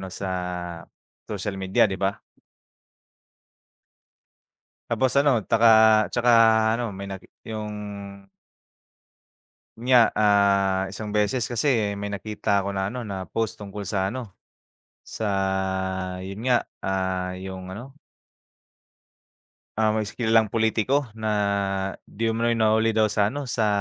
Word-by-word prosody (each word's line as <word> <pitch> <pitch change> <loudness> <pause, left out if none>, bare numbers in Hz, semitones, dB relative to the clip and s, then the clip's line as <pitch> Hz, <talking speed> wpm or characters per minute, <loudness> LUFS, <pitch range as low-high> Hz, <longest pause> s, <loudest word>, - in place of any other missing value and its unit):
ano 95 - -6
sa 95 +1 -5 1.0
social 105 0 -3
media, 95 0 +3
'di 95 -2 -2
ba? 100 +1 0 2.7
Tapos 130 -1 +2
ano, 140 -4 +4
taka, 115 0 +5 0.4
tsaka 120 0 +2 0.5
ano 120 -3 -3
may 100 +1 -7
nag 95 -1 -7 0.3
yung 110 -1 -4 2.0
yun 120 +3 -5
nga, 125 -2 +8
ah, 100 -2 +3
isang 105 +3 -6
beses 105 +4 0
kasi 115 -5 +1
may 100 - -4
nakita 100 0 -1
'ko 100 - -3
na 95 -1 -2
ano, 120 +5 -4
na 95 -4 -5
post 115 -2 -3
tungkol 105 0 -7
sa 95 0 -1
ano, 115 +1 -5 0.8
sa 95 -2 -2
yun 95 +3 -7
nga, 120 - +3 0.2
ah, 95 -1 -2
yung 95 0 -7
ano? 120 +8 -9 1.8
Ah, 110 -1 +3
may 110 0 -1
is 100 - -9
kilalang 110 -2 +3
pulitiko 115 +4 +1
na 110 - -4 0.8
'di 115 +2 -2
umano'y 115 +1 +1
nahuli 110 0 +2
daw 110 -1 +3
sa 100 0 +2
ano, 140 +7 -3
sa 115 -4 -1
105 Hz, 125 wpm, -24 LUFS, 95-115 Hz, 2.7 s, nga